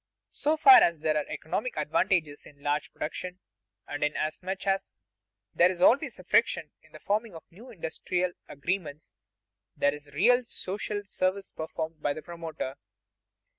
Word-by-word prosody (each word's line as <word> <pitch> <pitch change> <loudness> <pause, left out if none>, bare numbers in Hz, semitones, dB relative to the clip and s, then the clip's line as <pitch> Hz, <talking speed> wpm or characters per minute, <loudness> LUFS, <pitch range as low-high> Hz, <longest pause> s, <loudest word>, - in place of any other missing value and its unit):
So 305 +2 0
far 375 +3 +9
as 170 -1 +3
there 155 0 0
are 150 - 0
economic - - -3
advantages 160 -7 0
in 140 -1 -18
large 145 +1 -1
production, 180 +3 -5 0.5
and 145 0 -3
inasmuch 160 +6 -2
as 195 0 0 0.6
there 175 - +5
is 180 -1 -4
always 240 +9 +4
friction - - +2
in - - -24
the - - -11
forming 210 -1 -1
of 165 - -9
new 225 +9 -13
industrial 180 -2 -2 0.2
arrangements, 150 0 -4 0.6
there 145 0 +3
is 150 0 -10
a - - -17
real 245 - +4
social 205 -1 -4
service 195 0 -1
performed 160 0 -5
by 145 - +1
the 155 - -8
promoter. 165 -6 -6
175 Hz, 150 wpm, -28 LUFS, 150-200 Hz, 0.6 s, far